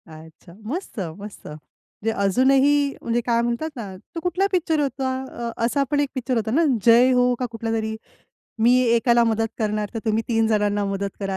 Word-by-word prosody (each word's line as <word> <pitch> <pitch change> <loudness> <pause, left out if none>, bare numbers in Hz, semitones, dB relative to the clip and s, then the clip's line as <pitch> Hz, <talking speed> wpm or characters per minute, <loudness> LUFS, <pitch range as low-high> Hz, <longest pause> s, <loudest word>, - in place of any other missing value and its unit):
अच्छा! 160 +2 -14
मस्त, 305 - -5 0.2
मस्त. 205 0 -10
म्हणजे 155 +8 -7
अजूनही 270 +7 +3
म्हणजे 235 +1 0
काय 235 -1 +2
म्हणतात 240 +6 -2
ना 205 -6 -7 0.2
तो - - -2
कुठला 360 +3 0
पिक्चर 330 -4 +1
होता? 270 -2 -1 0.2
अ, 235 0 -5
असा 275 +4 +1
पण 290 - +2
एक 290 -1 +1
पिक्चर 255 0 -2
होता 220 -1 -1
ना, 320 +7 +3 0.2
जय 240 +2 +6
हो 250 0 +3
का 255 - -1
कुठलातरी. 225 -1 -3 0.7
मी 240 +2 +5 0.2
एकाला 235 0 +3
मदत 225 0 0
करणार, 210 -2 -1
तर - - -2
तुम्ही 220 0 +1
3 225 -1 +2
जणांना 205 -2 +1
मदत 195 0 -3
करा. 195 -1 -2
230 Hz, 180 wpm, -23 LUFS, 210-265 Hz, 0.7 s, जय